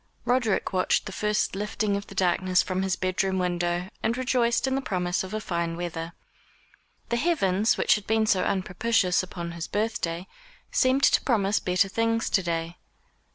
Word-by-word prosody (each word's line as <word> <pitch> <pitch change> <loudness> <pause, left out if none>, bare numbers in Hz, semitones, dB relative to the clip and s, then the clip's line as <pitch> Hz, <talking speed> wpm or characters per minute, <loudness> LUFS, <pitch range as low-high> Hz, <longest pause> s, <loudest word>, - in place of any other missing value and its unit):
Roderick 245 -5 +1
watched 185 -1 +1
the - - -6
first 210 0 0
lifting 210 0 -1
of 200 +1 -4
the - - -11
darkness 185 0 +2
from 185 0 -2
his 190 -2 0
bed 185 0 -1
room 190 -1 -1
window, 175 0 -1
and 230 +2 0
rejoiced 250 -2 +1
in 265 - 0
the 270 - 0
promise 180 -6 -1
of 190 - -8
a 215 - -2
fine 170 -4 -2
weather. 170 -1 -5 1.0
The 235 - +1
heavens, 220 - +2
which - - +4
had 210 -2 -3
been 220 0 +2
so 195 -3 +2
unpropitious 190 +1 +1
upon 175 -2 -6
his 170 0 -5
birthday, 190 -5 -2 0.5
seemed 260 +1 +2
to - - +5
promise 210 -5 +1
better 180 +2 +1
things 230 +3 0
to 195 - +3
day. 170 -1 -3
190 Hz, 175 wpm, -26 LUFS, 180-225 Hz, 1.0 s, to